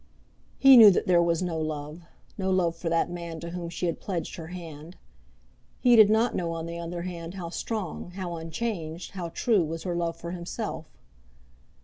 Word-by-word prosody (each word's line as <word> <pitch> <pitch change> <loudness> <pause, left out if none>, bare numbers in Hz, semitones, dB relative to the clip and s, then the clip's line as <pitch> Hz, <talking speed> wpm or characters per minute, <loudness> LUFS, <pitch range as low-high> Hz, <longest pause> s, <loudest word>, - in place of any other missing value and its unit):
He 270 -1 +8
knew 220 -3 +11
that 190 - +1
there 175 -2 +4
was 170 0 +1
no 170 -3 -2
love, 155 +1 -4 0.3
no 190 -2 -2
love 180 -3 +2
for 165 0 -4
that 165 +1 +1
man 170 -2 -6
to 170 +1 -7
whom 175 -1 -5
she 175 - -3
had 170 - -2
pledged 180 -4 -4
her 165 -2 -7
hand. 165 -1 -9 0.8
He 245 -2 +5
did 215 -2 +8
not 220 +2 +3
know, 170 -2 -2
on 165 0 -4
the 170 0 -6
other 170 0 -5
hand, 175 -1 -6
how 175 -3 -5
strong, 185 -2 -4
how 180 -3 -4
unchanged, 165 0 -4
how 180 -4 -5
true 210 +2 +2
was 165 +1 -5
her 180 - -2
love 170 -1 -2
for 170 0 -6
himself. 180 +1 -5
170 Hz, 195 wpm, -27 LUFS, 165-185 Hz, 0.8 s, knew